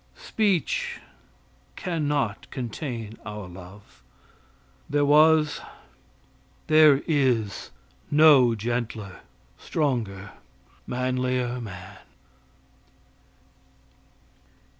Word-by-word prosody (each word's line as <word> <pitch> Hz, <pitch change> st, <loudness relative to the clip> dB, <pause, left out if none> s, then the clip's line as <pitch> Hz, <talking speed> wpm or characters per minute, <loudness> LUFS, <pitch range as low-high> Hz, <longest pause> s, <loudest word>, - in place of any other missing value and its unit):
Speech 470 Hz, -, -1 dB, 0.8 s
can 165 Hz, -5 st, -2 dB
not 135 Hz, -8 st, -2 dB
contain 120 Hz, -3 st, -6 dB
our 105 Hz, -2 st, -7 dB
love. 90 Hz, -4 st, -14 dB, 0.9 s
There 145 Hz, 0 st, +2 dB
was 150 Hz, +1 st, +4 dB, 1.0 s
there 155 Hz, -2 st, +5 dB
is 125 Hz, -, 0 dB, 0.4 s
no 145 Hz, -6 st, +6 dB
gentler, 110 Hz, -3 st, -4 dB, 0.4 s
stronger, 110 Hz, -, -2 dB, 0.6 s
manlier 125 Hz, 0 st, -1 dB
man. 95 Hz, -2 st, -10 dB
125 Hz, 60 wpm, -25 LUFS, 105-150 Hz, 1.0 s, no